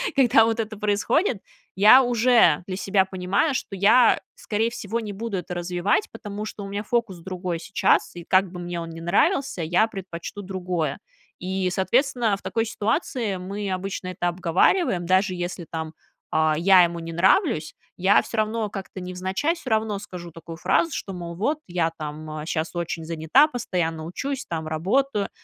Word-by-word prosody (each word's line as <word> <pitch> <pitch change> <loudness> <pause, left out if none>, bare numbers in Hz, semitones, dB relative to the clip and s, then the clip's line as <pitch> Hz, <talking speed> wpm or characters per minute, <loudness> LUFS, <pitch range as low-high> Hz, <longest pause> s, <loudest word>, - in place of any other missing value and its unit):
Когда 240 -4 +5
вот 225 0 -1
это 220 -1 -3
происходит, 210 - 0 0.3
я 215 +7 +8
уже 240 - +4
для 185 - -4
себя 195 0 +2
понимаю, 190 - 0
что 205 - -4
я, 215 +6 +5
скорей 225 +2 -1
всего, 230 -1 -3
не 210 -2 -5
буду 205 -1 -4
это 180 0 -5
развивать, 180 +4 0
потому 205 0 -6
что 210 -1 -7
у - - -6
меня 200 +1 -3
фокус 220 -5 -1
другой 180 -1 -4
сейчас, 195 0 +1
и 175 - -8
как 185 +1 +3
бы 180 - -8
мне 175 0 -4
он 165 - -6
ни 165 0 -8
нравился, 200 - +1
я 175 +7 +3
предпочту 195 -2 -7
другое. 180 -4 -3 0.4
И, 185 0 -2
соответственно, 235 +3 +1
в - - -18
такой 225 0 -1
ситуации 220 - -1
мы 195 +2 -5
обычно 185 0 -4
это 180 -1 -1
обговариваем, 175 - +2
даже 185 +2 +2
если, 175 0 -4
там, 160 -1 -5 0.4
а, 155 0 +2
я 185 +2 +6
ему 170 0 -1
не 165 0 -7
нравлюсь, 190 - +2 0.2
я 190 +3 +4
всё 230 - -7
равно 215 0 0
как-то 195 -1 -7
невзначай, 185 - -2
всё 330 -6 -8
равно 220 -2 0
скажу 175 -4 -9
такую 165 +1 -10
фразу, 330 - +1
что, 195 - -5
мол, 170 -1 -6
вот, 285 - -1
я, 175 -2 0
там, 155 0 -6
а, 155 0 -6
щас 160 0 -2
очень 170 -1 -3
занята, 165 - +4
постоянно 175 - -2
учусь, 270 - -4
там, 160 -2 -4
работаю. 200 - 0
190 Hz, 175 wpm, -24 LUFS, 175-220 Hz, 0.4 s, я